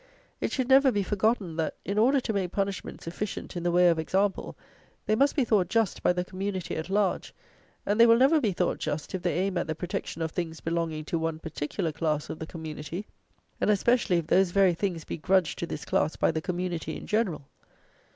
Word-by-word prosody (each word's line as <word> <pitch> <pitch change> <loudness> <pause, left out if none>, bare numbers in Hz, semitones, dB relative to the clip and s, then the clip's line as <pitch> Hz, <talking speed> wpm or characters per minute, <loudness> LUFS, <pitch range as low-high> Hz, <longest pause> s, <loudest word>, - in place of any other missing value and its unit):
It - - -2
should 260 -3 -1
never 270 0 +6
be 205 -3 0
forgotten, 200 -4 0
that, 160 -1 -1
in 200 +2 0
order 265 +5 +4
to 225 - -2
make 190 -3 -1
punishments 195 -1 -3
efficient 185 +4 -5
in 175 - -3
the 175 - 0
way 180 +1 +5
of 165 -2 +3
example, 190 +5 -1 0.5
they 215 - +1
must 280 +5 +3
be 275 -5 +2
thought 205 -6 +2
just 225 -5 +1
by - - +4
the 180 0 -1
Community 190 0 -4
at 160 +3 -4
large; 195 -1 0 0.5
and 205 +2 0
they 235 - +8
will 230 0 +6
never 285 +5 +5
be 220 -6 +1
thought 180 0 -1
just 150 +5 -3
if 185 - -2
they 175 -2 0
aim 190 -1 0
at - - -2
the 155 - -2
protection 170 -1 -4
of 160 - -2
things 165 -2 -4
belonging 165 -2 -2
to 165 - -1
one 160 -1 -2
particular 160 +2 -3
class 150 -1 -1
of 155 - -7
the 160 - -6
Community, 160 +3 -6 0.5
and, - - +1
especially, 210 -2 +3
if 170 - -1
those 190 +3 +3
very 190 0 +4
things 170 -2 -2
be - - -5
grudged 185 -1 +1
to 170 - -2
this 150 - -6
class 155 - +1
by - - +2
the 160 0 -2
Community 175 -2 -3
in - - -9
general. 195 -10 -1
180 Hz, 220 wpm, -28 LUFS, 165-205 Hz, 0.5 s, they